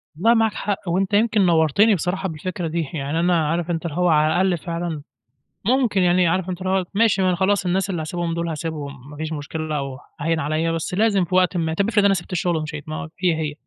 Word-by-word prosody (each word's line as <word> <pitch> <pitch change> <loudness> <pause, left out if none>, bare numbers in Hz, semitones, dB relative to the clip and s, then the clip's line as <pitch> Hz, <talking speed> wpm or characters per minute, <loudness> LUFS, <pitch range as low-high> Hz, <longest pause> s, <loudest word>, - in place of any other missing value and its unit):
والله 220 +9 +4
معاك 225 -2 +2
حق 205 -1 -2
وأنت 190 +3 0
يمكن 215 -1 +3
نوَّرتني 170 +6 +4
بصراحة 190 +2 -2
بالفكرة 170 +2 -4
دي. 160 -1 -2
يعني 145 +1 -2
أنا 170 -2 +2
عارف 170 +1 -1
أنت 165 0 -3
اللي 160 -2 -4
هو 180 0 +2
على 155 -1 +4
الأقل 180 0 +2
فعلًا 165 -1 -4 0.6
ممكن 240 -4 +2
يعني 180 0 +3
عارف 185 +2 0
أنت 180 0 -5
اللي 185 - -2
هو، 190 -1 +1
ماشي، 220 -1 +3
ما 185 - +3
أنا 180 - +2
خلاص 190 +1 +1
الناس 190 +2 0
اللي 175 -4 -2
هاسيبهم 170 +1 -3
دول 170 0 -2
هاسيبهم 145 -4 -6
ما 145 - -11
فيش 160 +1 -4
مشكلة 155 +1 -4
أو 135 -2 -5 0.2
هاين 165 +2 0
عليّا، 155 +2 0
بس 165 +1 -3
لازم 200 -1 +2
في 180 +2 -3
وقت 185 0 +3
ما، 160 -1 -1
طَب 195 +5 0
افرض 210 -3 +3
أنا 200 - +5
سِبت 175 -1 -4
الشُغل 175 -1 0
ومشيت 155 -1 -6
ما 155 +1 -5
هي، 180 -2 +4
هي. 155 -2 -3
175 Hz, 235 wpm, -22 LUFS, 160-190 Hz, 0.6 s, أنا